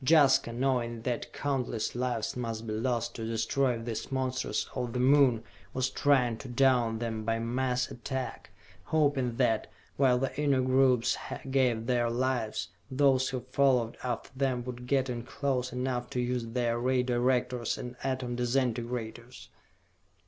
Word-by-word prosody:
Jaska, 135 -5 +5
knowing 120 -2 -1
that 120 -2 -3
countless 125 -6 -2
lives 120 -2 -2
must 115 -2 -4
be 110 - -3
lost 120 +1 -1
to 115 - -6
destroy 115 +3 +1
these 115 +2 -5
monsters 130 -1 -1
of 120 -2 -3
the 125 - -1
Moon, 130 -3 +5 0.3
was 130 0 0
trying 125 -6 +2
to - - -8
down 120 -3 +3
them 110 -1 -3
by 115 +1 0
mass 125 +2 -1
attack, 130 +1 -5 0.4
hoping 140 -6 +1
that, 115 -3 +1 0.3
while 130 -3 +4
the 135 +1 -2
inner 140 -3 +3
groups 130 -2 +3 0.4
gave 125 -4 +2
their 120 -1 +1
lives, 120 -3 -1 0.2
those 130 -1 +3
who 130 -2 -3
followed 130 -4 +3
after 120 -2 -3
them 130 -2 0
would 125 0 -7
get 135 -1 +2
in 120 -2 -3
close 130 0 -2
enough 125 -1 -2
to 135 -3 -3
use 125 -1 -1
their 120 0 0
Ray 125 +1 +2
Directors 125 -1 0
and 125 0 -6
Atom 130 -2 -2
Disintegrators. 120 -1 -2
125 Hz, 150 wpm, -30 LUFS, 120-130 Hz, 0.4 s, Jaska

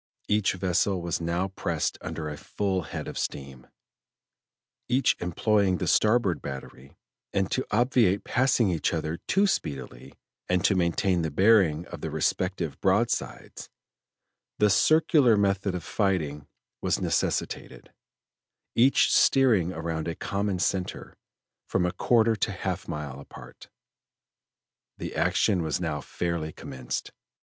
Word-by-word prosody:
Each 105 -1 +2
vessel 95 +1 0
was 85 -1 -3
now 85 +3 -1
pressed 95 - -2
under 80 -2 -5
a 75 - -5
full 95 +4 -2
head - - -5
of - - -5
steam, 65 -2 -5 1.2
each 125 +1 +3
employing 95 +2 +1
the - - -3
starboard 105 -4 +2
battery, 65 -1 -9 0.4
and 95 -1 0
to 130 - 0
obviate 110 -4 +2
passing 125 -5 +2
each 85 0 0
other 80 +1 -3
too 200 +1 +3
speedily, 70 - -4 0.3
and 90 +1 +1
to 100 - +4
maintain 90 0 +1
the 80 - -1
bearing 90 -2 +3
of - - -8
the - - -3
respective 90 -6 -2
broadsides, - - -1 0.9
the 105 -1 +4
circular 150 - +4
method 100 -1 +1
of 90 - -5
fighting 80 -9 -1 0.3
was - - 0
necessitated, - - -2 0.8
each 130 +4 +4
steering 115 -11 +4
around 80 -1 -4
a 85 - -3
common 100 -1 -2
center, 90 0 -2 0.5
from 90 -1 +1
a 90 - 0
quarter 115 +3 +3
to - - 0
half - - -4
a - - -11
mile 70 -3 -5
apart. 70 - -13 1.3
The - - -6
action 95 -5 +2
was 80 -3 -1
now - - -2
fairly 85 -3 -3
commenced. 65 -4 -6
90 Hz, 130 wpm, -27 LUFS, 80-105 Hz, 1.3 s, to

